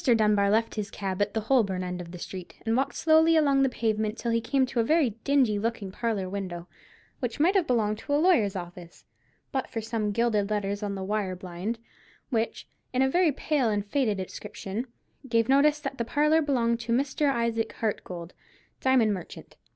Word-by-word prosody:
Dunbar 210 -4 +3
left 225 +2 +2
his 210 -2 -3
cab 195 -1 -4
at 205 +1 0
the 220 - +1
Holborn 210 -6 +1
end 180 0 -4
of 170 - -9
the 180 - -8
street, 180 +1 -8
and 225 0 +1
walked 265 +2 0
slowly 320 +1 +4
along 280 -3 +4
the 270 - +3
pavement 220 -2 -1
till 235 - -2
he 230 0 +1
came 265 +3 +2
to 250 -1 -3
a - - +4
very 300 -1 +3
dingy 260 -7 +3
looking 220 -3 -3
parlour 210 -3 -2
window, 185 -3 -5 0.5
which 245 -1 -3
might 340 +6 +4
have 380 -5 +2
belonged 215 -4 +1
to 285 - -3
a - - +4
lawyer's 300 - +3
office 175 -1 -9 0.5
but 265 -2 -2
for 225 - -3
some 220 -1 -2
gilded 215 -2 +1
letters 205 -1 -1
on 205 -1 -3
the 190 - -4
wire 195 -2 -1
blind, 185 +5 -5 0.5
which, 230 -1 -1 0.3
in 255 +1 +2
a - - +3
very 350 -1 +4
pale 280 -3 0
and 205 -1 -1
faded 215 -3 0
inscription, 195 +4 -5 0.4
gave 230 -1 +2
notice 290 +3 +4
that 275 -3 -5
the - - +1
parlour 300 +6 +3
belonged 235 -6 +1
to 235 0 -4
Mr. 275 +3 +1
Isaac 235 -2 -1
Hartgold, 180 -6 -4 0.5
diamond 250 -5 +3
merchant. 180 -4 -9
225 Hz, 195 wpm, -27 LUFS, 200-265 Hz, 0.5 s, slowly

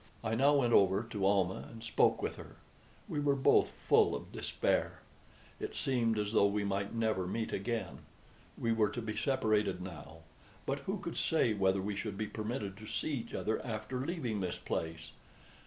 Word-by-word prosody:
I 110 -1 -1
now 140 +5 +4
went 120 -4 +3
over 100 +2 +5
to 105 -4 -1
Almah 95 -2 +1
and 115 -1 -10
spoke 115 - +2
with - - -2
her. - - -11 0.5
We 150 - -2
were 145 -1 +2
both 135 - +4
full - - +3
of - - -7
despair. - - -1 0.6
It - - -5
seemed 115 -4 +1
as 105 -1 -1
though 100 -2 +5
we 105 +1 0
might 100 +1 -2
never 110 -5 0
meet 110 +4 -2
again. 115 +3 -2 0.6
We 115 - 0
were 110 -2 +3
to 120 - -4
be 105 -1 -3
separated 110 -6 +1
now; 80 -3 -9 0.4
but - - -1
who - - 0
could - - -6
say 140 -8 +2
whether 95 -1 +2
we 105 +1 -2
should 100 -1 -4
be 110 - -1
permitted 105 -2 -4
to 110 - -10
see 155 - -1
each 115 -5 -4
other 110 - -1
after 115 +2 -3
leaving 135 - -2
this 90 -2 -2
place? 80 0 -4
110 Hz, 185 wpm, -33 LUFS, 100-115 Hz, 0.6 s, over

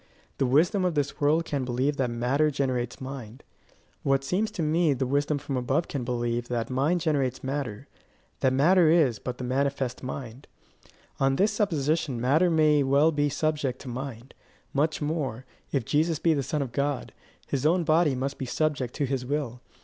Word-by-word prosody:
The 135 - +2
wisdom 170 +9 +3
of 180 -3 0
this 145 -1 -2
world 155 +3 +3
can 140 -4 -2
believe 130 +4 0
that 130 -2 0
matter 125 +6 +1
generates 130 -4 -2
mind: 130 -3 -8 0.6
what 135 0 +1
seems 190 +10 0
to 165 - -4
me 155 0 +2
the 130 +1 -1
wisdom 145 +3 +1
from 140 -1 -4
above 135 +6 0
can 135 -4 -3
believe 120 -1 -2
that 120 -1 -2
mind 145 +7 +1
generates 135 -6 0
matter 135 -2 -4 0.5
that 130 - +2
matter 160 +6 +5
is 150 -10 +3
but 125 +4 -5
the - - -6
manifest 135 0 -1
mind. 130 0 -7 0.7
On 135 0 +3
this 200 +7 +3
supposition 155 - 0
matter 150 +9 +3
may 155 -3 +4
well 140 +4 +4
be 145 -1 +1
subject 145 -3 -1
to - - -10
mind; 125 0 -6 0.4
much 155 +2 0
more, 140 -6 -2 0.3
if 135 -5 0
Jesus 160 +4 +1
be 165 +1 +2
the 145 - 0
Son 140 +2 -1
of 130 - -7
God, 140 0 -2 0.3
his 140 -2 -2
own 170 +3 +3
body 155 -3 +3
must 135 +2 -3
be 130 - -3
subject 140 -3 -1
to 145 - 0
his 135 -1 -2
will. 125 -3 -3
140 Hz, 180 wpm, -27 LUFS, 130-155 Hz, 0.7 s, matter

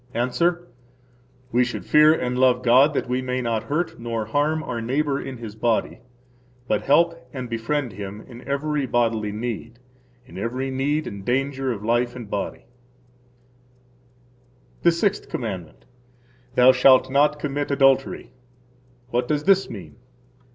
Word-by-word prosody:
–Answer: 170 +9 0 0.8
We 125 +1 +3
should 120 - -5
fear 150 0 +6
and 125 -5 -1
love 125 -1 +3
God 130 +5 +5
that - - -1
we 125 +1 -1
may 130 0 -2
not 115 -3 -2
hurt 155 +4 -2
nor 115 -2 -3
harm 150 +7 0
our 120 -5 -4
neighbor 140 +4 -1
in 135 -1 -7
his 115 -3 -8
body, 110 +1 -1 0.7
but 105 - +1
help 165 -1 +2
and 130 -1 -5
befriend 120 +2 -2
him 100 +1 -7
in 120 0 -12
every 140 0 -1
bodily 115 -3 0
need 115 +1 -5 0.5
[in 90 - -10
every 130 +5 -3
need 145 +4 -1
and 100 -1 -7
danger 135 +2 -1
of 105 -3 -5
life 120 +2 +1
and 120 -5 -9
body]. 100 - -4 2.2
The 170 - +5
Sixth 195 +4 -1
Commandment. 95 -9 -6 0.7
Thou 125 +1 +7
shalt 130 0 +5
not 145 +2 +3
commit 145 0 -3
adultery. 135 -2 +2 0.8
What 120 +1 0
does 150 -1 0
this 195 +1 +3
mean? 100 -6 -10
125 Hz, 145 wpm, -23 LUFS, 115-145 Hz, 2.2 s, Thou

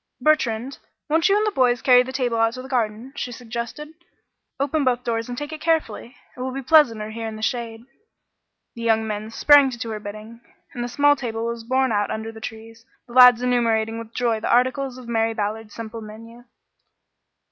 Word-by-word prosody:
"Bertrand, 270 -4 0 0.3
won't 325 +4 +3
you 400 - +4
and 425 - +1
the 425 - 0
boys 250 - +1
carry 250 -1 +6
the 255 +1 -5
table 250 -3 -1
out 225 0 +2
to 255 - -7
the - - -9
garden?" 240 0 -2
she 250 - -4
suggested. 240 +5 -6 0.7
"Open 285 +2 0
both 250 -1 +1
doors 230 0 -2
and 245 - -5
take 295 +3 -5
it 310 - -8
carefully. 305 -7 -1 0.2
It - - -15
will 255 +1 -3
be 270 +1 -5
pleasanter 240 -8 +3
here 225 0 -5
in 220 - -6
the 215 - -8
shade." 230 -1 -3 0.9
The 235 - -9
young 225 -1 +2
men 215 0 -4
sprang 285 +4 +5
to 245 - -7
do 230 -1 -5
her 215 - -4
bidding, 215 +3 -10 0.3
and 240 - -4
the - - -3
small 290 +4 +3
table 230 -4 -4
was 235 -1 -4
borne 260 +1 +1
out 205 -1 0
under 220 +1 -4
the 220 0 -13
trees, 225 +1 -9 0.2
the 240 - -14
lads 250 -1 +7
enumerating 230 -2 +1
with 230 -1 -9
joy 235 -2 0
the - - -2
articles 260 +1 +1
of 250 -2 -11
Mary 225 -1 0
Ballard's 215 0 -4
simple 225 0 -7
menu. 230 +3 -12
235 Hz, 205 wpm, -22 LUFS, 225-260 Hz, 0.9 s, lads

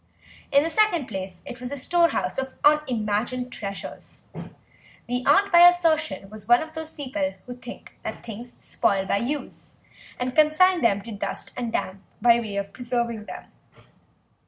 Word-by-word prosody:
In 280 +1 +5
the 325 - -1
second 350 -6 +2
place 190 -3 -6
it 245 - -8
was 250 +1 -6
a 285 - -4
storehouse 335 +2 +1
of 265 0 -4
unimagined 250 -4 +1
treasures. 200 -2 -8 0.8
The 245 +1 -2
aunt 400 0 +4
by 345 0 +9
assertion 315 - 0
was 215 -1 -11
one 240 +4 +5
of 315 0 -12
those 320 0 -6
people 205 -10 -3
who 250 - -7
think 245 0 -11
that - - -7
things 235 +2 -9
spoil 195 -1 0
by 195 - +1
use 275 +7 -5 0.4
and 250 0 -3
consign 330 +4 +4
them 200 -4 +2
to 230 - -8
dust 205 - -5
and 240 -2 -3
damp 195 -3 -3 0.2
by 235 +1 +5
way 215 -4 -5
of 200 0 -3
preserving 235 -3 -2
them. - - -10
245 Hz, 160 wpm, -25 LUFS, 215-305 Hz, 0.8 s, by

